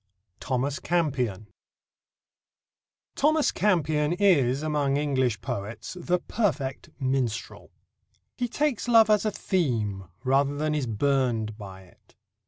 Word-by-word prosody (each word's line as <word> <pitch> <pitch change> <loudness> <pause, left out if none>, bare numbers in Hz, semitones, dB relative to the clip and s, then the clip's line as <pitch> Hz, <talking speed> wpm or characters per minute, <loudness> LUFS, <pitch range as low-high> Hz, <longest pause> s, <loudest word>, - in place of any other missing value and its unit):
THOMAS 135 +2 -1
CAMPION 130 - -1 1.7
Thomas 305 +1 +3
Campion 155 -6 +1
is 150 -9 +3
among 145 -3 0
English 130 -7 0
poets 105 - -5
the 175 +1 +1
perfect 155 - -2
minstrel. 130 -4 -2 0.7
He 245 - -1
takes 275 -1 -1
love 225 -2 +6
as 210 0 +3
a 215 - +1
theme 115 - -1 0.2
rather 140 +2 +2
than 155 +1 0
is 145 -4 -1
burned 115 -2 0
by 95 -3 -10
it. 90 - -24
140 Hz, 110 wpm, -26 LUFS, 120-175 Hz, 1.7 s, love